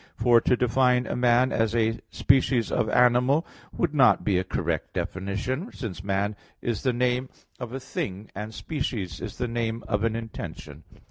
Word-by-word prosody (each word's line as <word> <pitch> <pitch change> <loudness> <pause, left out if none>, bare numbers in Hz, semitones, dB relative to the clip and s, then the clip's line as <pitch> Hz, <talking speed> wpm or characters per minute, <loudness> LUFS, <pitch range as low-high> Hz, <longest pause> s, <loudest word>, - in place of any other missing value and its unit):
For 120 +2 +4
to 125 - +2
define 125 +1 +3
a - - -3
man 125 +1 +3
as 115 0 +1
"a 115 0 +1
species 130 -3 +2
of 110 - +1
animal" 125 +5 +4 0.3
would 170 -4 -1
not 135 -4 +5
be 95 -3 +2
a - - -1
correct 95 - -2
definition; 105 - -3
since 95 -6 -6
man 100 +1 0 0.2
is 120 -4 -2
the 130 - +2
name 125 +1 0 0.3
of 120 -2 -6
a 135 - -4
thing, 100 -5 -5
and 105 +2 -5
species 110 - -4
is - - -7
a 125 - 0
name 115 -1 -2
of 105 -1 0
an 115 -1 +1
intention. 80 -9 -7
115 Hz, 175 wpm, -26 LUFS, 105-125 Hz, 0.3 s, not